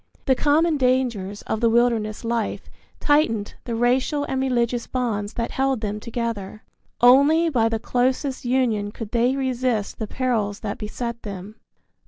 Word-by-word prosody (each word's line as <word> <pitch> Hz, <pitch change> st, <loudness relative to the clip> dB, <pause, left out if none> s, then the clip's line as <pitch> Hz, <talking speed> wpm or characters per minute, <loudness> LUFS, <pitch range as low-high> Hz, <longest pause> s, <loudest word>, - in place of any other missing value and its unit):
The 265 Hz, -, +4 dB
common 310 Hz, +4 st, +2 dB
dangers 245 Hz, -7 st, 0 dB
of 220 Hz, -, -2 dB
the 230 Hz, -, +4 dB
wilderness 230 Hz, -2 st, +1 dB
life 230 Hz, -1 st, -2 dB, 0.3 s
tightened 230 Hz, -9 st, +1 dB
the 235 Hz, -, -3 dB
racial 255 Hz, +5 st, +1 dB
and 265 Hz, -2 st, -2 dB
religious 240 Hz, -2 st, 0 dB
bonds 220 Hz, -5 st, -2 dB
that 230 Hz, 0 st, -3 dB
held 265 Hz, -3 st, 0 dB
them 210 Hz, -1 st, -3 dB
together. 225 Hz, -3 st, -4 dB, 0.4 s
Only 285 Hz, +7 st, +6 dB
by 230 Hz, -6 st, +2 dB
the 225 Hz, -, 0 dB
closest 255 Hz, +4 st, -1 dB
union 240 Hz, -5 st, 0 dB
could 225 Hz, -1 st, -8 dB
they 245 Hz, +2 st, +2 dB
resist 255 Hz, -5 st, -1 dB
the 220 Hz, -, -3 dB
perils 220 Hz, -5 st, -1 dB
that 210 Hz, +3 st, -4 dB
beset 235 Hz, +2 st, -5 dB
them. 200 Hz, +1 st, -8 dB
235 Hz, 150 wpm, -23 LUFS, 215-260 Hz, 0.4 s, Only